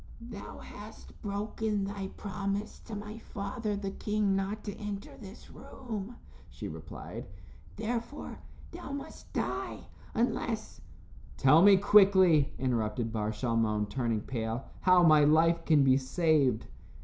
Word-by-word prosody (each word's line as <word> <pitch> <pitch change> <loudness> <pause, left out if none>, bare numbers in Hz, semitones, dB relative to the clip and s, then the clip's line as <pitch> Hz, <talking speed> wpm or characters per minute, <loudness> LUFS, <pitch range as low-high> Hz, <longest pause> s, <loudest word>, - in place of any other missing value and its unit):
"Thou 200 -2 -8
hast 210 +1 -12
broken 210 0 -2
thy 195 -1 -4
promise 200 +1 -3
to 225 - -6
my 210 +2 -7
father, 210 +1 -4
the 200 -1 -4
king, 210 -1 0
not 195 +2 -2
to 205 - -5
enter 205 -1 -6
this 195 -3 -12
room," 225 -2 -7 0.3
she - - -7
replied. - - -8 0.5
"Therefore, 235 +5 -4 0.3
thou 335 -6 -7
must 280 - -8
die, - - -3 0.3
unless 230 -1 -1 0.3
" - - -20
"Tell 150 +5 +6
me 200 +1 +8
quickly," 190 -7 +6
interrupted 115 -3 -1
Bar 105 -1 -1
Shalmon, 110 -2 0
turning 115 -4 -1
pale, 115 +1 -3
"how 185 -1 +5
my 155 -3 +7
life 165 +3 +4
can 150 -4 +5
be 130 -1 +5
saved." 140 -3 +2
195 Hz, 130 wpm, -30 LUFS, 135-210 Hz, 0.5 s, me